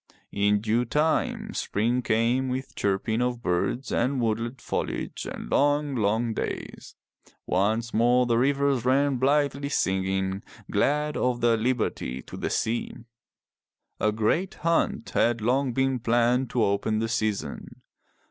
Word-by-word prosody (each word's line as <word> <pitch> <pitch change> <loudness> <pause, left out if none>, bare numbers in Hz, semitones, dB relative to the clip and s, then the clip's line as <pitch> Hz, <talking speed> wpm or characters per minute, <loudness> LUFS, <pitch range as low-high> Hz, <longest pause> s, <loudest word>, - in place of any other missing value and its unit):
In 105 0 +2
due 115 +3 +1
time 150 +6 0
spring 120 +5 0
came 120 +3 +1
with 130 +1 -4
chirping 105 +4 0
of 125 -1 -1
birds 90 +9 -1
and 130 +3 +1
woodland 115 +2 -1
foliage - - -4
and - - -7
long, 145 0 +2
long 110 +1 +1
days. - - -5 0.5
Once 110 +5 0
more 120 +2 +4
the 120 -1 +2
rivers 140 -1 +2
ran 135 +2 +2
blithely 140 +1 +1
singing, 95 -3 0 0.3
glad 150 +8 +1
of 125 -1 0
their 115 -1 +4
liberty, 110 - -2
to - - -10
the - - -3
sea. 115 +1 -1 1.0
A 105 - +2
great 110 - 0
hunt 165 -8 +1
had 120 0 +2
long 125 +4 +1
been 135 +1 0
planned 120 +2 +2
to 120 - +1
open 100 +2 +1
the 115 +1 0
season. 110 -3 -3
120 Hz, 135 wpm, -26 LUFS, 110-130 Hz, 1.0 s, more